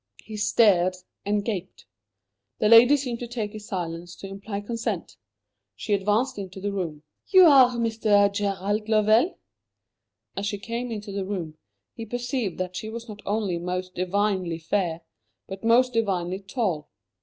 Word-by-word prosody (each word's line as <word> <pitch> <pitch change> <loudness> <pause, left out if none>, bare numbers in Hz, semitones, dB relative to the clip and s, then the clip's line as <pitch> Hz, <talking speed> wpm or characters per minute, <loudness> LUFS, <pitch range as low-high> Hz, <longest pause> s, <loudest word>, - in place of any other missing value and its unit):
He 220 - -9
stared 205 -4 +3 0.3
and 205 0 0
gaped. 190 -5 -5 0.7
The 215 - +2
lady 240 +5 +8
seemed 250 -4 -4
to 240 - -5
take 225 -3 -4
his 215 0 -9
silence 175 -2 -5
to 195 - -9
imply 200 +1 -6
consent. 225 -3 -4 0.6
She 210 - -3
advanced 210 +5 +1
into 190 -1 -7
the 205 +1 -2
room. 165 -6 -4 0.2
"You 375 -2 +7
are 260 -6 +6
Mr. 215 -3 +2
Gerald 205 +1 -1
Lovell?" 220 - +3 1.0
As 200 +1 -2
she 205 - -2
came 235 +4 -4
into 210 -2 -6
the 195 0 -3
room, 175 -6 -5 0.3
he 225 - -8
perceived 245 -4 -3
that 185 0 -4
she 215 - -5
was 230 +1 -7
not 210 -2 -9
only 200 -4 -1
most 180 +1 -4
divinely 185 -2 0
fair, 165 0 -1 0.4
but 195 +2 -8
most 245 +2 +4
divinely 190 -5 -1
tall. 195 - -2
205 Hz, 155 wpm, -25 LUFS, 185-230 Hz, 1.0 s, lady